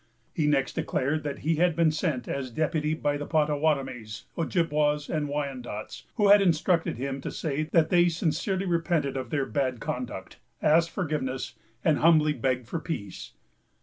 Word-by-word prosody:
He 155 -5 +1
next 135 -4 +1
declared 150 +4 -1
that 145 -2 -4
he 160 0 +2
had 175 0 +3
been 165 -2 +3
sent 155 -6 -2
as 135 -2 -3
deputy 155 +3 0
by 145 -2 -1
the 145 - -5
Pottawattamies, 145 -8 0
Ojibwas, 150 -3 +1
and 150 -3 -1
Wyandots, 130 -7 -5
who 210 -3 +3
had 205 0 +8
instructed 170 - +2
him 135 +1 -3
to - - -4
say 155 0 -2
that 160 -2 +3
they 175 -1 +5
sincerely 170 +4 -1
repented 165 -5 0
of 130 -1 -4
their 145 -3 0
bad 130 -4 -1
conduct, 120 -7 -5 0.2
asked 165 +2 +4
forgiveness, 150 -8 -3 0.3
and 155 -2 +3
humbly 155 -2 +5
begged 125 -2 -1
for 165 - -3
peace. 105 - -6
150 Hz, 160 wpm, -27 LUFS, 135-165 Hz, 0.3 s, had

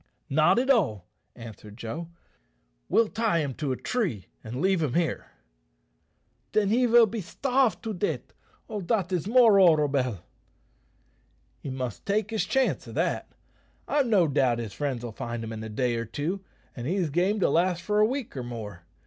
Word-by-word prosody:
"Not 155 +8 +4
at 260 +3 +3
all," 130 - +1 0.3
answered 110 -2 -11
Joe; 135 +9 -5 0.8
"we'll 230 - +4
tie 220 -4 0
him 145 -5 -1
to 145 +1 -3
a 130 - -2
tree 175 - -2 0.2
and 120 +4 -6
leave 190 +1 +2
him 145 -6 -1
here." 170 -2 0 1.3
"Then 210 -2 +2
he 245 +3 +3
vill 235 0 +7
be 220 +1 -4
starve 250 +2 +1
to 220 -1 -3
deat'. 195 +2 -3 0.3
Oh, 215 -3 -4
dat 190 -1 -1
is 180 0 -1
more 225 -3 +6
horrobell!" 145 - +3 1.4
"He - - -7
must 130 -4 -5
take 210 +2 0
his 220 - 0
chance 265 -1 0
o' - - -8
that. - - -2 0.5
I've 285 -3 +2
no 195 -7 +4
doubt 130 -4 +2
his 115 -4 -5
friends'll 120 -1 -3
find 120 0 -5
him 115 0 -5
in 110 0 -6
a 110 - -6
day 120 +2 0
or 115 - -3
two, 160 - -3 0.3
an' 120 - -6
he's 175 0 0
game 185 +7 +1
to - - +3
last 175 +1 +1
for 210 +3 +1
a 210 - +6
week 260 - -4
or 130 - -3
more. 110 -8 -7
170 Hz, 175 wpm, -27 LUFS, -, 1.4 s, vill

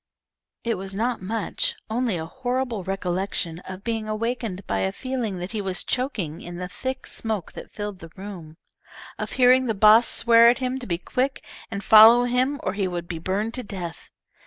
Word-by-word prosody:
It 230 -4 -1
was 195 0 -4
not 235 +2 -1
much, 225 - -2
only 225 -3 0
a 160 - -4
horrible 245 +2 -2
recollection 185 -2 -2
of 190 +1 -8
being 225 -2 -2
awakened 215 -3 -3
by 100 - -1
a 95 0 0
feeling 245 - -3
that 180 +2 -5
he 220 -2 -2
was 190 -2 -1
choking 215 - -2
in 175 0 -8
the 180 0 -4
thick 260 +7 -5
smoke 215 -6 -3
that - - -9
filled 205 -2 -6
the 165 - -10
room; 185 -5 -9 0.6
of - - -4
hearing 255 0 +5
the 225 - 0
boss 215 +3 +6
swear 230 0 +6
at 245 - +3
him 260 0 -2
to 245 - -8
be 170 -3 -1
quick 255 +9 -2 0.3
and 200 -2 -5
follow 225 +3 +8
him 255 +4 +1
or 185 - -1
he 195 -1 -1
would 175 -1 -4
be 170 -2 -5
burned 200 +6 -2
to 255 - -3
death. 185 -6 -7
215 Hz, 190 wpm, -24 LUFS, 185-245 Hz, 0.6 s, follow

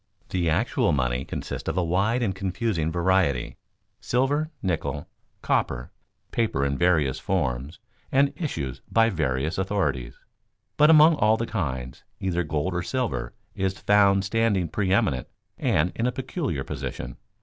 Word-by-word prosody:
The 85 -3 0
actual 75 - +1
money 65 -2 0
consists - - -5
of - - -3
a 90 - +2
wide 100 +8 +1
and 100 -4 0
confusing 95 -3 -1
variety: 85 -6 +1 0.4
silver, 145 +5 +1
nickel, 80 -5 -2 0.4
copper, - - 0 0.4
paper 105 - 0
in 70 0 0
various 80 -5 +2
forms 65 +6 -2 0.3
and 140 +1 +3
issued 70 - -4
by 115 0 +4
various 75 -2 -1
authorities. 85 -11 -1 0.6
But 150 +1 +5
among 155 0 +7
all 110 +1 +4
the 115 - -1
kinds, 65 - -4 0.2
either 90 -2 0
gold 75 +3 -1
or 90 - -1
silver 115 - -2 0.2
is 95 0 -1
found 100 -1 +4
standing 105 -4 +1
preëminent 95 - +1 0.3
and 85 +4 +2
in 115 - 0
a - - +1
peculiar 130 - -3
position. - - -6
90 Hz, 140 wpm, -25 LUFS, 70-115 Hz, 0.6 s, among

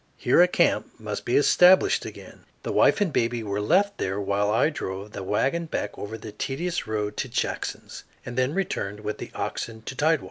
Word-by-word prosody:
Here - - +4
a 180 - +7
camp 175 -7 +1
must 105 -2 -5
be 120 - +2
established 180 +5 +5
again. - - -11 0.2
The - - -3
wife - - +4
and 185 -7 +1
baby 115 0 0
were 100 -1 -2
left 195 - +2
there 95 +2 -1
while 100 +1 0
I 115 +9 +3
drove 100 -6 -6
the - - -6
wagon 135 - 0
back 105 -9 -3
over 110 +2 -6
the 110 0 -9
tedious 160 +11 -3
road 105 -1 -2
to - - -2
Jackson's - - -4 0.2
and 120 - -6
then 130 +5 0
returned 105 - -2
with 105 0 -4
the - - -6
oxen 110 -1 -4
to 135 - -6
tidewater. 155 +3 +2
115 Hz, 200 wpm, -25 LUFS, 105-165 Hz, 0.2 s, a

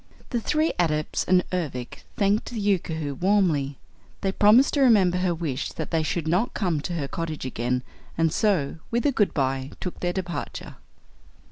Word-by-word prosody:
The 240 -3 0
three 310 +7 +1
Adepts 155 -3 0
and 180 -1 +4
Ervic 145 -9 -4 0.2
thanked 205 +1 +1
the 235 - -5
Yookoohoo 160 -7 -1
warmly. 175 -8 +2 0.4
They 195 - 0
promised 215 +7 +5
to 285 - +2
remember 195 -8 +5
her 180 -2 +1
wish 150 -5 -3
that 160 - -5
they 165 -1 +2
should 155 +1 -2
not 180 +9 +1
come 175 -7 0
to 175 - -4
her 150 -5 -2
cottage 160 -3 -4
again 125 0 -1 0.3
and 165 -1 +2
so, 180 -10 +1
with 235 0 0
a 290 - +4
good 210 -6 +2
bye, 135 -1 0
took 180 - -5
their 175 - 0
departure. 180 -2 -5
175 Hz, 170 wpm, -25 LUFS, 150-200 Hz, 0.4 s, promised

